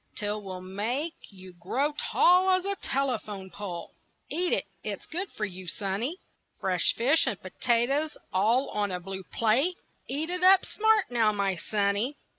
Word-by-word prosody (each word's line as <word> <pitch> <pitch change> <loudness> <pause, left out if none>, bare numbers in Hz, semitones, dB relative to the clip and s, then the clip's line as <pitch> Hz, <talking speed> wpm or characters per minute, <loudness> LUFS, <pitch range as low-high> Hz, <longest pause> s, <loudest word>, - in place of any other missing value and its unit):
'T 210 - -4
will 205 -3 -4
make 225 - -2 0.2
you 185 -2 -12
grow 250 - -1 0.2
tall 365 +2 +5
as 370 0 +3
a 400 0 0
telephone 215 - -2
pole 180 -3 -6 0.4
Eat 355 +3 +1
it, - - +1 0.2
it's - - -5
good 365 +4 -4
for 210 - -2
you, 185 -2 -8
sonny. 210 - -2 0.4
Fresh 185 -3 +1
fish 275 +6 +4
and 210 -7 -1
potatoes 250 +10 0 0.2
all 225 +8 +3
on 205 -1 0
a 180 -1 -2
blue 190 +2 -6
plate 245 - +1 0.3
Eat 310 +5 -2
it 360 0 -2
up 380 0 +7
smart 435 - +2
now, 225 -3 +3
my 200 -2 0
sonny. 205 +8 0
225 Hz, 160 wpm, -28 LUFS, 195-305 Hz, 0.4 s, up